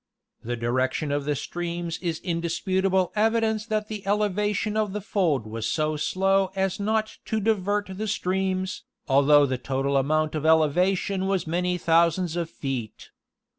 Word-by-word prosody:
The 120 Hz, +2 st, -2 dB
direction 130 Hz, +5 st, -1 dB
of 145 Hz, 0 st, -1 dB
the 150 Hz, 0 st, 0 dB
streams 170 Hz, +2 st, -4 dB
is 170 Hz, -3 st, -2 dB
indisputable 185 Hz, +2 st, 0 dB
evidence 220 Hz, 0 st, +1 dB
that 215 Hz, -2 st, -1 dB
the 215 Hz, -2 st, -6 dB
elevation 210 Hz, +1 st, 0 dB
of 215 Hz, -3 st, 0 dB
the 210 Hz, -, -2 dB
fold 180 Hz, -, 0 dB
was 110 Hz, +1 st, -4 dB
so 155 Hz, -1 st, 0 dB
slow 195 Hz, +4 st, +1 dB
as 190 Hz, 0 st, -1 dB
not 215 Hz, +1 st, -1 dB
to 220 Hz, -, -1 dB
divert 205 Hz, -1 st, 0 dB
the 215 Hz, +3 st, -3 dB
streams, 190 Hz, -2 st, -1 dB, 0.2 s
although 145 Hz, +1 st, +5 dB
the 130 Hz, -2 st, -2 dB
total 135 Hz, +2 st, 0 dB
amount 155 Hz, +3 st, +1 dB
of 155 Hz, -2 st, -3 dB
elevation 180 Hz, +5 st, +2 dB
was 195 Hz, -3 st, 0 dB
many 180 Hz, +2 st, 0 dB
thousands 170 Hz, 0 st, +2 dB
of 170 Hz, -2 st, -2 dB
feet. 130 Hz, -8 st, -5 dB
180 Hz, 150 wpm, -25 LUFS, 150-200 Hz, 0.2 s, although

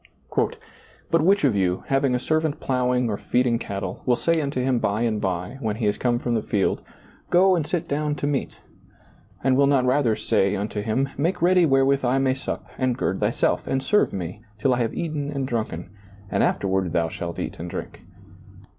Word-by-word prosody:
" -, -, -19 dB, 0.8 s
But 165 Hz, -, +4 dB
which 195 Hz, +4 st, +3 dB
of 130 Hz, -7 st, +3 dB
you, 95 Hz, -2 st, 0 dB
having 135 Hz, -1 st, +2 dB
■ 125 Hz, -, +1 dB
servant 155 Hz, +2 st, 0 dB
plowing 125 Hz, -1 st, +1 dB
or 105 Hz, -2 st, -1 dB
feeding 120 Hz, -2 st, +1 dB
cattle, 100 Hz, -3 st, -5 dB
will 125 Hz, -, +3 dB
say 165 Hz, +5 st, +1 dB
unto 140 Hz, -2 st, -2 dB
him 125 Hz, -1 st, +1 dB
by 105 Hz, +1 st, 0 dB
and 110 Hz, -3 st, 0 dB
by, 90 Hz, +6 st, -3 dB
when 110 Hz, -5 st, -2 dB
he 110 Hz, 0 st, -2 dB
is 105 Hz, -, 0 dB
come 120 Hz, -1 st, +1 dB
from 120 Hz, 0 st, -2 dB
the 115 Hz, -, +1 dB
field. 100 Hz, -2 st, 0 dB, 0.5 s
Go 185 Hz, +1 st, +5 dB
and 160 Hz, -4 st, -1 dB
sit 170 Hz, +1 st, -2 dB
down 150 Hz, +1 st, -1 dB
to 145 Hz, -, -3 dB
meat? 145 Hz, -2 st, -2 dB, 0.4 s
" -, -, -29 dB
And 130 Hz, 0 st, +3 dB
will 140 Hz, +1 st, +4 dB
not 135 Hz, -2 st, +3 dB
rather 125 Hz, -3 st, +2 dB
say 100 Hz, -3 st, +1 dB
unto 105 Hz, +1 st, -3 dB
htm, 130 Hz, +6 st, -1 dB
Make 165 Hz, +3 st, 0 dB
ready 180 Hz, -1 st, +5 dB
wherewith 135 Hz, 0 st, +3 dB
I 125 Hz, +1 st, +2 dB
may 135 Hz, -1 st, +2 dB
sup, 130 Hz, -, -5 dB
and 130 Hz, -2 st, +1 dB
gird 95 Hz, -6 st, -1 dB
thyself, 105 Hz, +3 st, 0 dB
and 135 Hz, 0 st, 0 dB
serve 210 Hz, +8 st, +3 dB
me, 90 Hz, +2 st, -5 dB, 0.2 s
till 130 Hz, +5 st, +1 dB
1 125 Hz, -, +1 dB
have 115 Hz, -2 st, 0 dB
eaten 150 Hz, -4 st, -3 dB
and 140 Hz, -2 st, -2 dB
drunken; 110 Hz, -8 st, -3 dB, 0.4 s
and -, -, +1 dB
afterward 95 Hz, -2 st, +1 dB
thoa 85 Hz, -1 st, 0 dB
shalt 85 Hz, -1 st, -5 dB
ea.t -, -, -5 dB
and 85 Hz, +1 st, -5 dB
drink? -, -, -7 dB
125 Hz, 210 wpm, -24 LUFS, 105-140 Hz, 0.8 s, Go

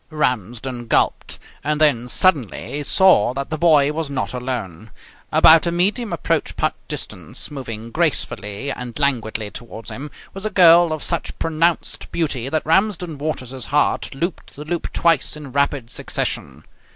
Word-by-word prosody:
Ramsden 120 Hz, -, -2 dB
gulped. -, -, +1 dB, 0.3 s
And 150 Hz, +1 st, 0 dB
then 135 Hz, -6 st, +3 dB
suddenly 145 Hz, -, +1 dB
he 145 Hz, -, -3 dB
saw 145 Hz, -, +4 dB
that 140 Hz, +2 st, -4 dB
the 155 Hz, -, -1 dB
boy 150 Hz, -4 st, +5 dB
was 155 Hz, -1 st, -3 dB
not 135 Hz, -2 st, -3 dB
alone. 115 Hz, -6 st, -5 dB, 0.4 s
About 165 Hz, +1 st, +6 dB
a -, -, +1 dB
medium 200 Hz, +6 st, +1 dB
approach 170 Hz, -, -1 dB
putt -, -, 0 dB
distance, -, -, -5 dB
moving 115 Hz, -5 st, -7 dB
gracefully 140 Hz, -7 st, -1 dB
and 125 Hz, -3 st, -6 dB
languidly 110 Hz, -7 st, -1 dB
towards 115 Hz, -1 st, -9 dB
him, 145 Hz, +3 st, -7 dB, 0.2 s
was 195 Hz, -, -7 dB
a 215 Hz, -, 0 dB
girl 175 Hz, -3 st, +6 dB
of 155 Hz, -2 st, -3 dB
such 170 Hz, -, -2 dB
pronounced 165 Hz, +1 st, -1 dB
beauty 135 Hz, -6 st, -1 dB
that 155 Hz, +1 st, -1 dB
Ramsden 175 Hz, -2 st, +1 dB
Waters's 135 Hz, -4 st, -4 dB
heart 145 Hz, -1 st, 0 dB
looped 170 Hz, +6 st, -4 dB
the 150 Hz, -, -8 dB
loop 170 Hz, +1 st, -3 dB
twice 165 Hz, -3 st, +1 dB
in 145 Hz, -3 st, -9 dB
rapid 140 Hz, -3 st, 0 dB
succession. -, -, -3 dB
145 Hz, 150 wpm, -21 LUFS, 125-165 Hz, 0.4 s, About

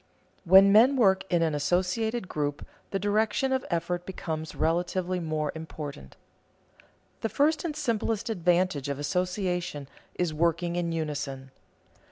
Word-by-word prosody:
When 190 Hz, +3 st, +8 dB
men 235 Hz, +7 st, +6 dB
work 195 Hz, -7 st, +3 dB
in 170 Hz, -1 st, +3 dB
an 160 Hz, -2 st, 0 dB
associated 185 Hz, +8 st, 0 dB
group, 145 Hz, -3 st, -3 dB, 0.2 s
the 195 Hz, -, -1 dB
direction 215 Hz, +6 st, +1 dB
of 260 Hz, -, 0 dB
effort 175 Hz, 0 st, -1 dB
becomes 160 Hz, -4 st, -5 dB
relatively 175 Hz, +2 st, 0 dB
more 155 Hz, -3 st, -2 dB
important. 150 Hz, -, -8 dB, 1.1 s
The 225 Hz, -, -1 dB
first 300 Hz, +8 st, +2 dB
and 320 Hz, -4 st, -3 dB
simplest 230 Hz, -6 st, -1 dB
advantage 180 Hz, -, +1 dB
of 140 Hz, -, -2 dB
association 180 Hz, -1 st, -2 dB, 0.3 s
is 175 Hz, -3 st, -1 dB
working 170 Hz, +2 st, 0 dB
in 175 Hz, -1 st, -1 dB
unison. 140 Hz, -4 st, -4 dB
175 Hz, 130 wpm, -27 LUFS, 155-200 Hz, 1.1 s, When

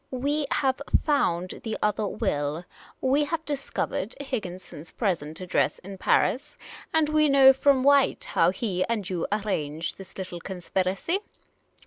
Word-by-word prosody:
" -, -, -43 dB, 0.2 s
We 295 Hz, -1 st, 0 dB
have 265 Hz, -1 st, +1 dB, 0.2 s
found 185 Hz, -, 0 dB
the 220 Hz, -1 st, -3 dB
other 210 Hz, 0 st, 0 dB
will 155 Hz, -5 st, -2 dB, 0.2 s
— -, -, -24 dB
we 275 Hz, +3 st, +3 dB
have 320 Hz, +1 st, -3 dB
discovered 275 Hz, -6 st, -3 dB
Higginson's 185 Hz, -, -6 dB
present 165 Hz, -8 st, -2 dB
address 185 Hz, -, +1 dB
in 195 Hz, +1 st, -10 dB
Paris 260 Hz, -, +1 dB, 0.2 s
— -, -, -17 dB
and 320 Hz, -1 st, +3 dB
we 305 Hz, 0 st, +3 dB
know 270 Hz, -1 st, +8 dB
from 265 Hz, -1 st, +3 dB
White 280 Hz, -, +4 dB
how -, -, +3 dB
he 190 Hz, -7 st, -1 dB
and 215 Hz, -5 st, -2 dB
you 180 Hz, -3 st, -2 dB
arranged 170 Hz, -8 st, -2 dB
this 195 Hz, -, -12 dB
little 185 Hz, -2 st, -5 dB
conspiracy. 190 Hz, -, -2 dB
210 Hz, 150 wpm, -26 LUFS, 180-280 Hz, 0.2 s, know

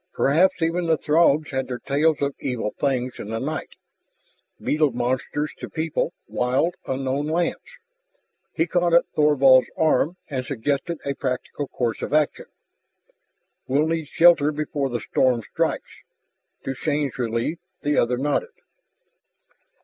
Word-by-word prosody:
Perhaps 175 Hz, +5 st, +3 dB
even 170 Hz, +1 st, 0 dB
the 160 Hz, -1 st, +3 dB
Throgs 155 Hz, -1 st, +3 dB
had 130 Hz, -1 st, -2 dB
their 125 Hz, -, -4 dB
tales 145 Hz, +4 st, +1 dB
of 140 Hz, 0 st, 0 dB
evil 115 Hz, -5 st, -2 dB
things 130 Hz, -3 st, -1 dB
in 105 Hz, -, -6 dB
the 115 Hz, -, -2 dB
night, 155 Hz, +4 st, -4 dB, 0.8 s
beetle 150 Hz, -1 st, +1 dB
monsters 130 Hz, +5 st, -2 dB
to -, -, -7 dB
people 160 Hz, 0 st, -1 dB, 0.2 s
wild, 130 Hz, +8 st, 0 dB
unknown 135 Hz, +2 st, -1 dB
lands. 170 Hz, +2 st, 0 dB, 0.9 s
He 165 Hz, -, +1 dB
caught 175 Hz, 0 st, +2 dB
at 170 Hz, -, +5 dB
Thorvald's 135 Hz, -4 st, +5 dB
arm 160 Hz, +1 st, +2 dB
and 130 Hz, -3 st, -3 dB
suggested 140 Hz, +6 st, -2 dB
a 140 Hz, -, -1 dB
practical 135 Hz, +2 st, -3 dB
course 120 Hz, -4 st, -2 dB
of -, -, -1 dB
action. 155 Hz, -1 st, +1 dB, 1.2 s
"We'll 140 Hz, +4 st, +2 dB
need 160 Hz, -1 st, -2 dB
shelter 165 Hz, -3 st, +5 dB
before 145 Hz, -2 st, -2 dB
the 120 Hz, -1 st, -2 dB
storm 125 Hz, 0 st, +1 dB
strikes." -, -, -3 dB, 0.6 s
To 135 Hz, -, -3 dB
Shann's 145 Hz, -1 st, -2 dB
relief 115 Hz, +7 st, -1 dB, 0.2 s
the 145 Hz, 0 st, +2 dB
other 125 Hz, +1 st, +1 dB
nodded. 145 Hz, -, -1 dB
145 Hz, 135 wpm, -23 LUFS, 130-160 Hz, 1.2 s, at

